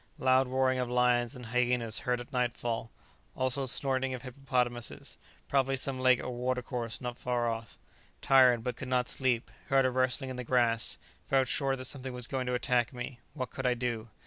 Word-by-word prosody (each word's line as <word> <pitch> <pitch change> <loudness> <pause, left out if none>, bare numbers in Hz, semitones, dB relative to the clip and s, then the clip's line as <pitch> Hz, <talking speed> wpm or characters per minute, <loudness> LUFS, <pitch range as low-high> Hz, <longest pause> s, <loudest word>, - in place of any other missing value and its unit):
Loud 130 -2 +3
roaring 130 0 +1
of 125 -1 -1
lions 125 +1 +2
and 125 -1 -9
hyenas 120 -1 0
heard 125 -1 -1
at 120 +4 -10
nightfall, 120 -2 -1 0.5
also 130 +1 +1
snorting 130 0 0
of 125 - -9
hippopotamuses; 125 -2 -2 0.3
probably 135 -1 +2
some 130 0 -1
lake 130 -1 +5
or - - -4
water 125 +1 -1
course 120 -2 -4
not 125 -1 -5
far 120 -1 0
off. 115 -1 -4 0.4
Tired, 125 -4 +5
but 125 -1 -2
could 135 - -7
not 125 -1 +1
sleep; 125 -3 0 0.2
heard 135 -1 +4
a 130 - +2
rustling 130 +1 0
in 130 - -6
the 125 - -4
grass; 120 -2 +1 0.3
felt 135 -1 +3
sure 135 -2 +2
that 130 -1 -6
something 130 -1 -5
was 125 -1 +2
going 130 -1 -3
to 125 - 0
attack 120 -1 +1
me; 125 -1 -6 0.2
what 130 -5 -4
could 130 -1 -2
I 125 - +2
do? 120 -2 -3
125 Hz, 195 wpm, -31 LUFS, 120-130 Hz, 0.5 s, lake